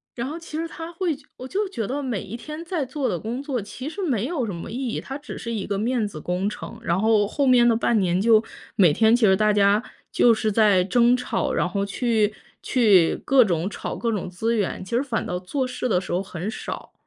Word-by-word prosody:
然 235 +1 -3
后 305 +4 -5
其 330 -2 -9
实 330 +1 -2
它 330 0 -8
会 340 -4 -1 0.2
我 255 - -7
就 405 +8 -1
觉 230 - -4
得 280 +3 -3
每 240 -7 -2
一 230 - -7
天 305 +6 -7
在 340 -5 -2
做 265 +1 -2
的 175 - -2
工 235 +7 -4
作 280 -3 -2
其 255 +7 -7
实 360 - -9
没 250 - 0
有 290 -6 -1
什 205 - -4
么 170 - -7
意 255 +3 -3
义， - - -3
它 270 - -6
只 290 - -9
是 235 - -5
一 215 -4 -3
个 200 - -2
面 230 0 0
子 175 -7 -8
工 180 +4 -1
程， 220 +1 -8
然 175 -4 +1
后 215 -2 +3
后 280 +6 0
面 245 -2 +6
的 230 - +4
半 230 0 +2
年 180 -1 +1
就 220 0 +5 0.3
每 180 -8 +5
天 220 +6 +4
其 240 -2 +3
实 190 -2 +5
大 215 +2 +3
家 205 0 +4 0.3
就 235 - +5
是 215 0 0
在 205 -3 +4
争 240 +5 +3
吵， 250 - -1
然 - - +1
后 195 +3 -2
去 220 0 +1 0.3
去 205 -10 +4
各 270 -2 +6
种 175 -3 0
吵 - - -5
各 235 - -1
种 200 -4 -3
资 225 +6 -1
源， 200 -3 -2
其 - - -12
实 245 - +3
反 245 -5 -2
倒 180 - -3
做 260 +9 -2
事 250 0 -3
的 180 - +3
时 180 - -7
候 180 - +1
很 190 0 -5
少， - - -7
225 Hz, 265 characters per minute, -24 LUFS, 200-260 Hz, 0.3 s, 面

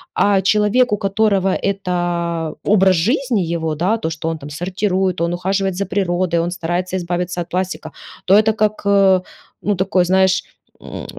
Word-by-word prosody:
а 200 -1 +3
человек, 210 +5 +2
у - - +1
которого 200 -1 +1
эта 175 -4 -2
образ 195 -2 +4
жизни 235 - +1
его, 160 -2 -2
да, 185 +9 +1
то, 160 - -3
что 160 0 -4
он 165 - -3
там 145 0 -9
сортирует, 185 +3 -1
он 170 +1 0
ухаживает 190 +1 -1
за 200 +2 -2
природой, 180 -3 0
он 170 +1 -1
старается 180 +2 -2
избавиться 175 0 -3
от 170 - -7
пластика, 185 +1 -3 0.3
то 190 - +3
это 220 +1 +4
как, 215 0 0
э, 195 -2 +4 0.4
ну 205 - 0
такое 190 0 +1
знаешь, 190 +1 +2 0.4
м, - - -8
185 Hz, 165 wpm, -18 LUFS, 175-200 Hz, 0.4 s, образ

